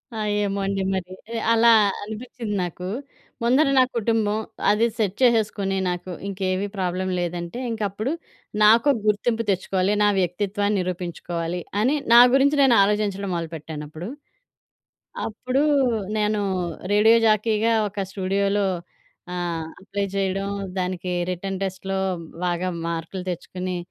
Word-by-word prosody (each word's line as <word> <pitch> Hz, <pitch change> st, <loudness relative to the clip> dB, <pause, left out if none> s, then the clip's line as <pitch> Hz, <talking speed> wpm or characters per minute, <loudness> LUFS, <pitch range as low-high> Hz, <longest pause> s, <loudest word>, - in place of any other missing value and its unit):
ఆ! -, -, -4 dB, 0.3 s
ఏమో 200 Hz, 0 st, -1 dB
అండి 195 Hz, 0 st, -1 dB
మరి. 185 Hz, -1 st, -4 dB, 0.2 s
ఆహ్, 230 Hz, -, -2 dB
అలా 230 Hz, +1 st, +6 dB, 0.3 s
అనిపిచ్చింది 220 Hz, 0 st, -5 dB
నాకూ. 180 Hz, +1 st, -5 dB, 0.6 s
ముందర 260 Hz, +6 st, +4 dB
నా 260 Hz, -, +8 dB
కుటుంబం, 220 Hz, -2 st, +1 dB, 0.3 s
అది 210 Hz, +3 st, +4 dB
సెట్ 205 Hz, -4 st, 0 dB
చేసేసుకొని 215 Hz, -5 st, +2 dB
నాకు 180 Hz, +1 st, -3 dB, 0.2 s
ఇంకేవీ 190 Hz, 0 st, -1 dB
ప్రాబ్లమ్ 185 Hz, 0 st, -1 dB
లేదంటే, 175 Hz, +5 st, -4 dB
ఇంకప్పుడు 215 Hz, +3 st, -2 dB, 0.5 s
నాకు 230 Hz, +6 st, +6 dB, 0.2 s
గుర్తింపు 225 Hz, +2 st, +1 dB
తెచ్చుకోవాలి, 190 Hz, +1 st, +1 dB
నా -, -, +5 dB
వ్యక్తిత్వాన్ని 200 Hz, +3 st, 0 dB
నిరూపించుకోవాలి. 175 Hz, -1 st, -3 dB, 0.2 s
అని 260 Hz, +7 st, +3 dB, 0.2 s
నా 240 Hz, -, +10 dB, 0.2 s
గురించి 280 Hz, +2 st, +4 dB
నేను 255 Hz, -4 st, +6 dB
ఆలోచించడం 200 Hz, -1 st, 0 dB
మొదలు 165 Hz, -1 st, -3 dB
పెట్టానప్పుడు. 155 Hz, +2 st, -7 dB, 1.2 s
అప్పుడూ 255 Hz, +5 st, -1 dB, 0.5 s
నేనూ 210 Hz, 0 st, +1 dB, 0.5 s
రేడియో 220 Hz, +3 st, +6 dB
జాకీగా 215 Hz, +1 st, +2 dB, 0.2 s
ఒక 200 Hz, -, -11 dB
స్టూడియోలో 200 Hz, +1 st, 0 dB, 0.7 s
ఆహ్, 170 Hz, -2 st, -2 dB, 0.2 s
అప్లై 200 Hz, +1 st, -3 dB
చెయడం, 195 Hz, 0 st, -1 dB, 0.3 s
దానికీ 180 Hz, 0 st, -2 dB, 0.2 s
రిటన్ 190 Hz, +1 st, -4 dB
టెస్ట్‌లో 190 Hz, 0 st, -3 dB, 0.5 s
బాగా 175 Hz, +1 st, 0 dB, 0.2 s
మార్కులు 170 Hz, +3 st, -4 dB
తెచ్చుకుని, 180 Hz, +1 st, -4 dB
195 Hz, 120 wpm, -23 LUFS, 180-215 Hz, 1.2 s, నా